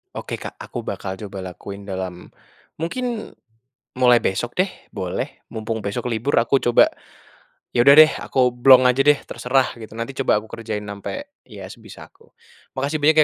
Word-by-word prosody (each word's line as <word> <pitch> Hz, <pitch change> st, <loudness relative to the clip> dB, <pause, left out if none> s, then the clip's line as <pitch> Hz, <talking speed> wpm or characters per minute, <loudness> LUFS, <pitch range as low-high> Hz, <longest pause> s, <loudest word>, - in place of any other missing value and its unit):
Oke, -, -, -5 dB
Kak, -, -, -8 dB
aku -, -, -7 dB
bakal 95 Hz, 0 st, -5 dB
coba 100 Hz, -1 st, -7 dB
lakuin 100 Hz, +2 st, -9 dB
dalam 95 Hz, -2 st, -5 dB, 0.5 s
mungkin 235 Hz, +7 st, -4 dB, 0.6 s
mulai 125 Hz, -2 st, +5 dB
besok 120 Hz, +5 st, -2 dB
deh, 185 Hz, +2 st, +2 dB, 0.2 s
boleh, 90 Hz, -2 st, -4 dB
mumpung 110 Hz, 0 st, -4 dB
besok 100 Hz, +3 st, -4 dB
libur 115 Hz, +5 st, -1 dB
aku 120 Hz, +4 st, +3 dB
coba, 120 Hz, -1 st, +5 dB, 0.9 s
yaudah 140 Hz, +4 st, +7 dB
deh, 155 Hz, 0 st, +9 dB
aku 125 Hz, -2 st, +1 dB
blong 130 Hz, +1 st, +6 dB
aja 125 Hz, +2 st, +2 dB
deh, 145 Hz, +1 st, +5 dB
terserah, 130 Hz, +1 st, 0 dB
gitu. 110 Hz, -, -10 dB
Nanti 115 Hz, +4 st, -4 dB
coba 125 Hz, -, +3 dB
aku -, -, -14 dB
kerjain 110 Hz, -2 st, -5 dB
sampe 275 Hz, -, -7 dB
ya 100 Hz, -5 st, -10 dB
sebisa 115 Hz, -2 st, -13 dB
aku. -, -, -25 dB, 0.5 s
Makasih 145 Hz, +3 st, -1 dB
banyak 155 Hz, +2 st, +4 dB
120 Hz, 160 wpm, -21 LUFS, 100-140 Hz, 0.9 s, deh